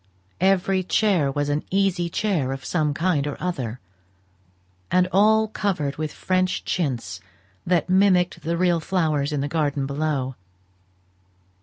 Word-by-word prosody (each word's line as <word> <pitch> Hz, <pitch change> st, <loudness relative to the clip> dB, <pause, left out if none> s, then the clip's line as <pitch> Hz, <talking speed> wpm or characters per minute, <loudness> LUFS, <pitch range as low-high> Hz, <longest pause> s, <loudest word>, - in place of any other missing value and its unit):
Every 190 Hz, 0 st, +2 dB
chair 185 Hz, -6 st, +2 dB
was 145 Hz, +1 st, -1 dB
an 145 Hz, +1 st, -1 dB
easy 190 Hz, -3 st, +1 dB
chair 165 Hz, -9 st, -1 dB
of 135 Hz, 0 st, -8 dB
some 155 Hz, -4 st, 0 dB
kind 150 Hz, -2 st, 0 dB
or 145 Hz, -, -4 dB
other; 130 Hz, -10 st, -3 dB, 1.1 s
and 180 Hz, 0 st, +3 dB
all 220 Hz, +3 st, +4 dB
covered 175 Hz, -10 st, -2 dB
with 155 Hz, -1 st, -3 dB
French 185 Hz, 0 st, -1 dB
chintz 140 Hz, -9 st, -2 dB, 0.5 s
that 175 Hz, -2 st, +2 dB
mimicked 185 Hz, -2 st, +3 dB
the 165 Hz, +2 st, -2 dB
real 175 Hz, -1 st, +2 dB
flowers 155 Hz, -5 st, 0 dB
in 145 Hz, -2 st, -1 dB
the 140 Hz, -, -1 dB
garden 145 Hz, -3 st, -1 dB
below. 140 Hz, -2 st, -2 dB
170 Hz, 135 wpm, -23 LUFS, 145-185 Hz, 1.1 s, all